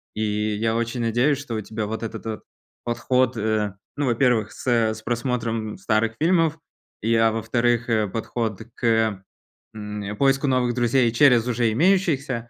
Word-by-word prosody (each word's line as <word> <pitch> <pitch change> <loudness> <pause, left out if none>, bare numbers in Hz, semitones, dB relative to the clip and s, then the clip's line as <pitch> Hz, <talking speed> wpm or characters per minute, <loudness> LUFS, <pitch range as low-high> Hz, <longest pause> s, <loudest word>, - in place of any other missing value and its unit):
И 105 0 -1
я 110 +2 0
очень 115 +1 -2
надеюсь, 120 +5 +2
что 140 -5 -6
у 110 - -2
тебя 110 +1 -4
вот 110 +1 -4
этот 110 -1 -5 0.4
подход, 125 +1 0
э, 105 -2 -1 0.2
ну, 145 - -1
во-первых, 120 -3 +2
с - - -11
с 110 -3 +1
просмотром 115 -2 -2
старых 110 +1 0
фильмов, 165 -1 +2 0.4
и, 115 +2 +1
а 115 0 +4
во-вторых, 115 +1 0
э, 110 -2 +2
подход 110 0 -3
к, 110 -4 +1 0.5
м, 105 -1 -6
поиску 135 +1 +2
новых 125 -2 +1
друзей 120 0 +2
через 125 -2 +4
уже 115 -2 +1
имеющихся. 140 - +1
115 Hz, 150 wpm, -23 LUFS, 110-125 Hz, 0.5 s, а